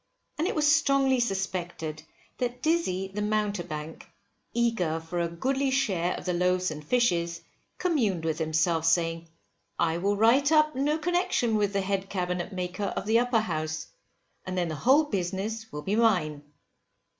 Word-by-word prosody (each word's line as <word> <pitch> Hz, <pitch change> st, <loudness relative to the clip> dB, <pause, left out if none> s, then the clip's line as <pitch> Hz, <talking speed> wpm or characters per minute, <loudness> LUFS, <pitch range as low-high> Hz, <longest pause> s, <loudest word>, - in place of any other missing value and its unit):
And 325 Hz, -, +1 dB
it -, -, -2 dB
was 300 Hz, -1 st, +4 dB
strongly 275 Hz, -4 st, +3 dB
suspected 185 Hz, -7 st, -3 dB, 0.4 s
that 250 Hz, 0 st, -3 dB
Dizzy 250 Hz, -, 0 dB
the 205 Hz, +2 st, -4 dB
Mountebank, 190 Hz, -7 st, -3 dB, 0.4 s
eager 225 Hz, -9 st, 0 dB
for 165 Hz, +2 st, -5 dB
a 170 Hz, -, +1 dB
goodly 265 Hz, +11 st, -1 dB
share 195 Hz, -10 st, 0 dB
of -, -, -8 dB
the 180 Hz, -, 0 dB
loaves 180 Hz, 0 st, +1 dB
and 150 Hz, 0 st, -7 dB
fishes, 170 Hz, -5 st, +1 dB, 0.4 s
communed 225 Hz, -, 0 dB
with 160 Hz, 0 st, -1 dB
himself, 160 Hz, +1 st, +1 dB
saying, 165 Hz, 0 st, +1 dB, 0.5 s
I 165 Hz, 0 st, +1 dB
will 200 Hz, +3 st, +1 dB
write 255 Hz, +7 st, +4 dB
up 305 Hz, -1 st, +4 dB
no 290 Hz, +3 st, +1 dB
connection 320 Hz, -9 st, +1 dB
with 205 Hz, -1 st, +1 dB
the 200 Hz, -, +1 dB
head 195 Hz, 0 st, -2 dB
Cabinet 180 Hz, -1 st, -2 dB
Maker 185 Hz, +1 st, -3 dB
of 195 Hz, -, -3 dB
the 225 Hz, +2 st, +4 dB
Upper 245 Hz, -2 st, +2 dB
House, 155 Hz, -5 st, -3 dB, 0.5 s
and 185 Hz, 0 st, -5 dB
then 175 Hz, -2 st, 0 dB
the 155 Hz, -, -3 dB
whole 265 Hz, -, +4 dB
business 210 Hz, -, -3 dB
will 150 Hz, -, -6 dB
be 200 Hz, -, 0 dB
mine. 180 Hz, -11 st, +2 dB
195 Hz, 160 wpm, -27 LUFS, 170-240 Hz, 0.5 s, was